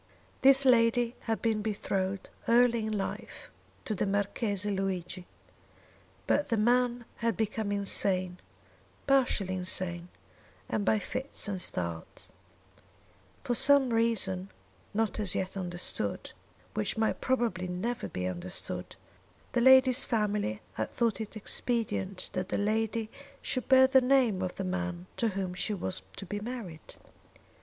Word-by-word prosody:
This 270 +1 +6
lady 240 -1 +4 0.2
had 225 - -1
been 220 -2 +1
betrothed 195 -2 -2 0.2
early 235 -1 +4
in - - -3
life 195 - -6 0.3
to 220 - -2
the 200 - -1
Marchese 205 0 -1
Luigi; 185 -2 -3 1.0
but 295 - +1
the 230 - +1
man 240 +2 +2
had 230 -4 -1
become 215 -1 -1
insane 185 -2 +1 0.7
partially 255 -8 +2
insane 180 -1 -1 0.6
and 210 - -1
by 215 - +3
fits 255 +5 -3
and 195 -3 -2
starts. 85 - -3 1.1
For 245 - 0
some 270 +1 +5
reason, 210 - 0 0.4
not 220 0 -1
as 200 -4 +2
yet 190 +1 -2
understood, 175 - -3 0.4
which 110 - 0
might 220 0 0
probably 235 -8 0
never 225 +7 -3
be 90 - -4
understood, 90 0 -5 0.6
the 240 - +1
lady's 260 0 +6
family 210 - -1
had 110 - -3
thought 230 -2 0
it 220 0 -6
expedient 200 -4 0
that 185 0 -3
the - - -1
lady 220 +1 -1 0.3
should 255 - -3
bear 260 -1 +8
the 265 0 +5
name 250 -7 +3
of 185 -1 -3
the 195 - -4
man 180 -1 -3
to 230 - +1
whom 190 -3 -3
she 205 +3 -1
was 95 - -3
to 195 - -7
be 205 +3 -4
married. 210 -8 -7
210 Hz, 135 wpm, -30 LUFS, 185-235 Hz, 1.1 s, bear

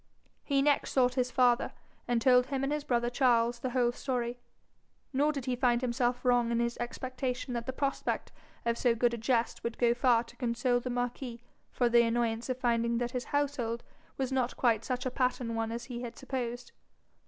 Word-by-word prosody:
He 275 -2 +2
next 290 -1 +2
sought 250 -2 +3
his 250 -1 0
father, 250 -2 +3 0.3
and 240 -1 +2
told 250 0 +5
him 275 -1 -2
and 275 +2 0
his 300 -1 -2
brother 240 -2 0
Charles 240 -2 +3
the 255 - -2
whole 245 -1 +2
story; 245 -1 -3 0.7
nor 290 +3 +3
did 275 -4 -5
he 255 - 0
find 245 -1 +2
himself 245 0 0
wrong 245 -1 +3
in 235 - +1
his 235 0 0
expectation 255 +1 -3
that 235 -1 -3
the - - 0
prospect 275 +1 -2 0.3
of 235 0 0
so 240 -2 +3
good 235 +1 +2
a - - -2
jest 230 0 0
would 235 - -3
go 235 -1 +3
far 240 -1 +3
to 240 0 -16
console 245 0 +1
the 250 - -5
marquis 245 -1 -3 0.3
for 245 - +1
the 235 0 +6
annoyance 230 0 0
of 255 - -1
finding 235 -2 +1
that 240 0 -1
his 250 -1 -3
household 270 -5 -1 0.3
was 265 -1 -1
not 255 -2 0
quite 230 -3 +2
such 250 0 -3
a 255 - -1
pattern 250 -2 0
one 225 0 -1
as 235 +1 -4
he 240 -1 -6
had 240 -1 -7
supposed. 245 -2 -4
245 Hz, 200 wpm, -31 LUFS, 235-255 Hz, 0.7 s, the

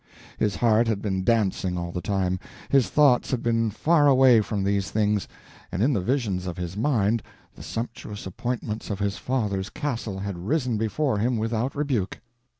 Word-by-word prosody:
His 105 -2 +1
heart 115 0 +3
had 110 -3 0
been 95 -2 -2
dancing 95 -4 +1
all 85 0 -3
the 90 - -4
time, 95 -1 0 0.3
his 135 -3 +3
thoughts 145 -5 +4
had 130 - -1
been 115 -1 +1
faraway 135 -2 +5
from 105 -2 -2
these 100 0 0
things, 105 -2 +1 0.4
and 95 - 0
in 140 +3 +3
the 100 - +1
visions 100 -5 -1
of 85 - -5
his 90 0 -4
mind 115 -2 +1 0.3
the - - -13
sumptuous 115 -3 -6
appointments 110 +3 -4
of 100 - -2
his 100 0 -1
father's 105 -6 -1
castle 125 -9 -3
had 95 -2 -5
risen 130 -5 +1
before 110 +1 0
him 120 +3 +1
without 115 +4 -1
rebuke. 135 -10 -1
110 Hz, 170 wpm, -25 LUFS, 100-125 Hz, 0.4 s, faraway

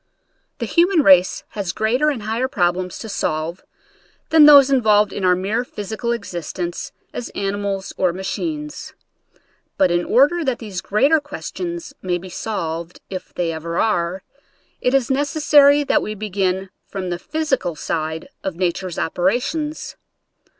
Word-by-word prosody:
The - - -3
human 345 -2 +3
race 185 -3 +5
has 200 -5 -3
greater 240 - +1
and 255 -8 -3
higher 225 +4 -1
problems 180 -4 -1
to 225 - -7
solve 165 -3 -2 0.7
than 315 -2 +8
those 280 -2 +8
in 265 -2 +4
volved 210 -2 +3
in 200 - -4
our 180 -1 +4
mere 200 +6 -1
physical 220 +1 -4
existence 180 - -4 0.2
as 245 - -5
ani 200 0 -1
mals 195 -1 -3
or 185 -2 +2
machines. 300 - -5 0.8
But 190 -2 +3
in 175 0 +1
order 295 - +3
that 260 -5 0
these 205 -5 -6
greater 275 +10 +3
questions 340 0 -6
may 180 -1 -1
be 185 +2 -10
solved, 170 -4 -4
if 185 - -6
they 170 -2 -1
ever 165 +1 -4
are, 185 -3 0 0.6
it 250 +2 +2
is 270 -2 +1
necessary 290 0 +4
that - - +2
we 215 - -4
begin 190 -2 -2 0.2
from 185 -2 -4
the 175 - -3
physical 290 - -1
side 160 +1 -3 0.2
of 190 - -3
nature's 180 0 -2
operations. 245 - -1
205 Hz, 150 wpm, -20 LUFS, 180-275 Hz, 0.8 s, than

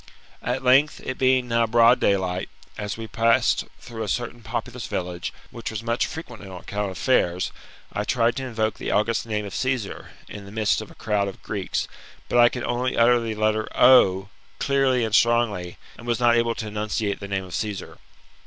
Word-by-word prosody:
At 125 +2 -2
length, 135 +4 +4
it 130 - -5
being 130 -1 +3
now 115 -1 +2
bright 115 +2 +5
daylight, 95 -2 0 0.3
as 105 0 -4
we 115 - -5
passed 115 +1 +2
through 115 -2 -8
a 110 - -2
certain 120 +2 -3
populous 120 +2 -5
village, 90 -1 -4 0.2
which 115 - -6
was 110 0 -5
much 115 +1 0
frequented 120 -10 -8
on 90 -2 -8
account 105 +2 -3
of 95 - -8
fairs, 90 -8 +1 0.4
I - - -1
tried 120 -1 +1
to 135 - -3
invoke 110 -2 -2
the - - -4
august 110 +2 +1
name 105 -2 -2
of 100 - -7
Csesar, 130 -6 -2 0.2
in 100 -1 -9
the 100 - -11
midst 110 0 +1
of 110 - -9
a - - -15
crowd 105 -2 0
of 100 - -8
Greeks, 100 -3 -2 0.4
but 120 - +3
I 120 0 +8
could 125 - -5
only 125 +1 -1
utter 120 +1 +5
the 115 -1 -3
letter 110 0 +1
O! 95 -6 +6 0.3
clearly 135 -3 +2
and 110 - -4
strongly, 115 -7 +2 0.2
and 120 - -10
was 120 -2 0
not 120 -1 +4
able 115 0 +1
to 110 - -5
enunciate 105 -1 -2
the 100 - -7
name 100 -1 -2
of 90 -2 -10
Cassar. 105 -3 -4
115 Hz, 200 wpm, -24 LUFS, 105-120 Hz, 0.4 s, I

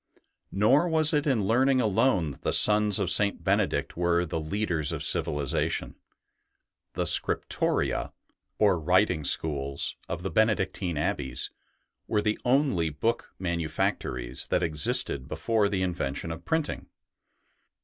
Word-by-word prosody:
Nor 130 - +3
was 160 -1 +4
it 150 0 +1
in 115 -8 +1
learning 130 +5 +2
alone 100 - +1
that - - -14
the - - -1
sons 105 -1 +4
of 95 -3 0
St. 100 +2 +2
Benedict - - 0
were 85 0 +1
the 80 - -4
leaders 80 -2 -2
of - - -4
civilization. 75 -2 -1 1.0
The - - -2
scriptoria, - - +2 0.5
or 100 -5 +3
writing 90 0 +1
schools, 70 -3 -1
of 85 +1 -5
the 95 - -3
Benedictine 95 -5 0
abbeys 75 - -2 0.6
were 105 - 0
the 105 0 -1
only 125 - +1
book 115 +10 -3
manufactories 80 -8 -2
that - - 0
existed 75 -4 +1
before 100 +7 0
the 95 -2 -1
in 90 -1 -1
vention 80 +1 -4
of 85 +1 -12
printing. 160 -2 -2
95 Hz, 130 wpm, -27 LUFS, 80-110 Hz, 1.0 s, was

